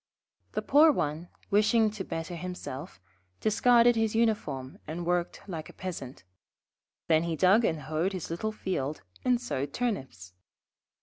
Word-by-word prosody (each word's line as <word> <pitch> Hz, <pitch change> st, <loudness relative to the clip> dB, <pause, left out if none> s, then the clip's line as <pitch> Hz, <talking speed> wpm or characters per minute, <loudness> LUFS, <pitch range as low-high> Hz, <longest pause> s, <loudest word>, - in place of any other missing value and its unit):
The -, -, -2 dB
poor 300 Hz, +3 st, +6 dB
one, 160 Hz, -, -2 dB, 0.2 s
wishing 215 Hz, +2 st, +4 dB
to 210 Hz, -2 st, -5 dB
better 165 Hz, 0 st, -5 dB
himself, 155 Hz, -, -6 dB, 0.4 s
discarded 235 Hz, +2 st, +5 dB
his 225 Hz, -1 st, +1 dB
uniform 150 Hz, -, 0 dB
and 170 Hz, +2 st, -4 dB
worked 175 Hz, 0 st, -1 dB
like 165 Hz, -5 st, -6 dB
a -, -, -12 dB
Peasant. 140 Hz, -, -7 dB, 0.8 s
Then 160 Hz, -1 st, +4 dB
he 165 Hz, -1 st, -1 dB
dug 190 Hz, +7 st, +5 dB
and 160 Hz, -7 st, 0 dB
hoed 155 Hz, +6 st, -1 dB
his 180 Hz, -3 st, -5 dB
little 215 Hz, +6 st, -2 dB
field 155 Hz, -, -3 dB, 0.2 s
and 250 Hz, -1 st, +3 dB
sowed 140 Hz, -, -3 dB
Turnips. 130 Hz, -, -3 dB
180 Hz, 140 wpm, -29 LUFS, 155-220 Hz, 0.8 s, poor